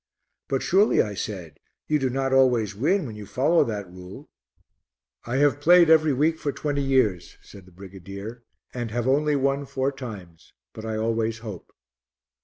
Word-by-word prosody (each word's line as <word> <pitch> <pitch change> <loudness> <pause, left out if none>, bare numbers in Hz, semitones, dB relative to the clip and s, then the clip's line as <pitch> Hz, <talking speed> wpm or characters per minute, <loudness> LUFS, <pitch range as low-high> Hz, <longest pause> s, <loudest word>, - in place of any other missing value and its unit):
"But 135 - -1
surely," 200 +4 +3
I 105 - +1
said, 90 -7 -6 0.3
"you 150 -1 +1
do 135 -2 0
not 135 +1 -1
always 125 -5 +3
win 165 - +1
when 110 -4 -7
you 105 -2 -9
follow 155 +6 +2
that 105 -4 -4
rule?" 90 0 -12 1.0
"I 120 - -2
have 145 0 +3
played 170 +1 +6
every 155 -1 +5
week 155 +4 +1
for 145 - -2
twenty 145 0 -2
years," 130 -10 0
said 95 -2 -14
the - - -17
brigadier, 100 +5 -9 0.3
"and 120 -2 -4
have 120 +2 -2
only 150 +2 +2
won 140 0 0
four 135 0 -1
times; 105 -11 -10 0.2
but 110 - -9
I 110 -1 -3
always 115 0 -1
hope." 100 -6 -8
125 Hz, 170 wpm, -24 LUFS, 105-140 Hz, 1.0 s, played